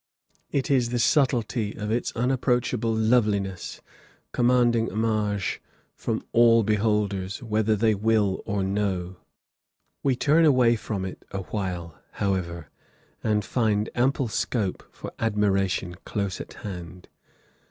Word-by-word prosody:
It 140 0 0
is 125 -3 +3
the 120 - -1
subtlety 120 -4 +1
of 105 0 -3
its 120 +2 0
unapproachable 125 -2 0
loveliness, 105 -5 0 0.5
commanding 120 -2 +3
homage 105 -2 -1 0.3
from - - -3
all 115 -1 +5
beholders, 105 -2 0
whether 110 -1 +1
they 110 +1 +3
will 105 -2 +1
or 100 -1 0
no. 95 -2 -2 0.8
We 135 -2 +2
turn 150 +6 +3
away 125 -6 +5
from 100 -3 -4
it 95 - -8
awhile, 90 -4 -4
however, 85 -6 -2 0.5
and 105 -1 +1
find 110 -3 0
ample 130 +1 +1
scope 105 -3 -2
for - - -8
admiration 100 -4 +1
close 100 -3 -3
at - - -10
hand. 90 -2 -8
105 Hz, 115 wpm, -25 LUFS, 100-120 Hz, 0.8 s, all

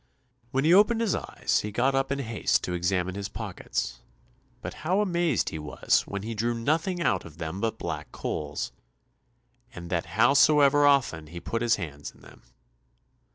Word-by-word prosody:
When 135 +2 0
he 160 +3 +5
opened 210 +4 +5
his 225 -5 +1
eyes, - - -1
he 105 - -4
got 125 +6 +1
up 135 0 0
in 140 - 0
haste 115 -5 0
to 90 - -3
examine 90 +1 0
his 100 0 -5
pockets, - - -4 0.6
but - - -6
how 180 +5 +1
amazed 175 - +1
he 80 - -6
was 75 -1 0
when 100 0 -5
he 115 +2 -4
drew 115 +2 -1
nothing 160 +9 0
out 95 - +1
of 80 -2 -13
them 85 +3 -5
but 115 -1 -1
black - - -5
coals, 75 -1 -4 1.0
and 85 -1 -8
that 85 -2 -1
howsoever 145 +3 +5
often 125 - +2
he 85 +3 -8
put 115 +7 -3
his 120 -1 +3
hands 75 -6 -6
in - - -21
them. - - -16
115 Hz, 175 wpm, -27 LUFS, 90-145 Hz, 1.0 s, he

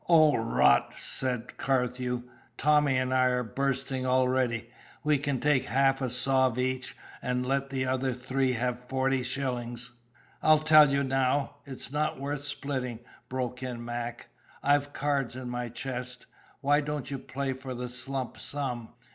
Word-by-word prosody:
"O, 155 -3 +7
rot!" 115 0 +3
said 125 -2 -3
Carthew. 125 -2 0 0.3
"Tommy 150 -2 +4
and 130 0 0
I 130 0 +4
are 125 -1 +2
bursting 135 +2 -1
already. 125 -2 +1 0.3
We 150 -2 +3
can 140 -2 -1
take 140 -2 +2
half 135 +1 +2
a 130 - 0
sov' 130 0 +2
each, 130 0 -2 0.2
and 125 0 -1
let 135 +1 0
the 130 -1 -1
other 130 0 0
three 130 +1 0
have 125 +1 -2
forty 130 0 +1
shillings." 125 -2 -3 0.5
"I'll 155 0 +6
tell 155 -1 +7
you 140 0 +2
now 135 +1 +1
it's 135 -1 -7
not 150 -1 0
worth 140 +1 -3
splitting," 130 -5 -3 0.3
broke 125 -1 -3
in 120 -2 -5
Mac. 120 0 -5 0.3
"I've 145 0 +3
cards 140 -4 -1
in 125 -1 -5
my 120 0 -3
chest. 125 0 -5 0.4
Why 145 +1 +4
don't 145 -2 -4
you 135 - -3
play 135 +1 -3
for 130 0 -7
the 125 +1 -4
slump 130 +1 -4
sum?" 125 -5 -4
130 Hz, 155 wpm, -29 LUFS, 125-140 Hz, 0.5 s, O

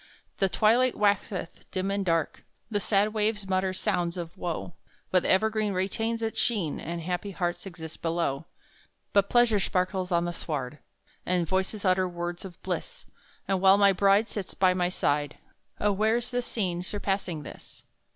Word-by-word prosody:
The 195 - +3
twilight 235 +6 +3
waxeth 200 -4 -1
dim 190 +1 -2
and 200 0 0
dark, 165 -4 0 0.3
The 205 - +1
sad 205 +1 +2
waves 210 -2 0
mutter 190 0 +1
sounds 180 -2 -1
of 170 -1 -6
woe, 175 0 -4 0.4
But 185 - +4
the - - -2
evergreen 215 +1 +2
retains 225 +5 -1
its 220 0 -1
sheen, 205 -11 0
And 170 0 -4
happy 180 +4 -3
hearts 180 0 -3
exist 165 -3 -9
below; 165 -3 -1 0.7
But 200 -1 +4
pleasure 240 -4 +4
sparkles 185 0 -1
on 170 0 +2
the 175 - -2
sward, 145 -4 -4 0.4
And 180 -2 0
voices 190 +3 -1
utter 185 0 +3
words 175 +1 -5
of 180 -3 -10
bliss, - - -4 0.4
And 195 -1 +1
while 190 +1 +7
my 200 -1 +5
bride 200 +3 +4
Sits 200 -5 -5
by 185 -1 +4
my 180 -1 +1
side, 145 -5 0 0.4
Oh, 210 - +2
where's 220 +5 +1
the 245 0 0
scene 185 -8 -1
surpassing 195 -4 -2
this? - - -11
190 Hz, 165 wpm, -28 LUFS, 175-205 Hz, 0.7 s, while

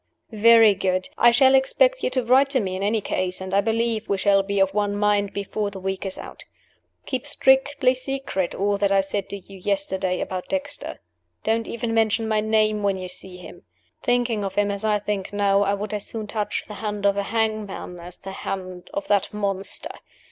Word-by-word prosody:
"Very 225 0 +7
good. 185 -1 -1
I 240 - +6
shall 265 +2 +5
expect - - +3
you - - 0
to 255 0 0
write 260 +4 +4
to 270 -2 +2
me, 190 -4 -2
in 190 - -4
any 210 +2 +1
case; 185 -1 -2
and 190 0 -6
I 200 - +4
believe 225 +1 -1
we 200 - +1
shall 195 0 +4
be 200 0 -2
of 195 0 +3
one 205 0 0
mind 205 -1 +1
before 200 +1 -3
the 195 -1 -9
week 190 +1 -3
is 190 - -5
out. - - -9 0.6
Keep 260 -1 -3
strictly 265 -1 +3
secret 255 -8 -3
all 200 +1 0
that 200 -1 +2
I 195 0 +4
said 195 0 -3
to 200 - -4
you 195 0 -13
yesterday 190 -1 -1
about 185 -1 -4
Dexter. 285 0 -4 0.4
Don't 225 +1 0
even 235 0 -3
mention 225 0 +2
my 215 -1 +1
name 215 -1 +2
when 200 -1 +1
you 185 -1 -6
see 180 0 -7
him. 180 - -12 0.4
Thinking 240 -3 +1
of 195 -1 -4
him 205 0 +2
as 200 +1 -4
I 215 -1 +2
think 205 -2 -3
now, 200 -1 +3
I 200 0 +2
would 210 +1 -5
as 205 -1 -3
soon 220 -2 -4
touch 210 0 -3
the 210 - -8
hand 210 -2 -3
of 200 - +5
the 200 - -1
hangman 215 -4 -2
as 175 +1 -10
the 195 - -8
hand 185 -2 -6
of 300 0 -3
that 200 -2 +1
monster! 200 -2 -1
205 Hz, 210 wpm, -23 LUFS, 195-225 Hz, 0.6 s, Very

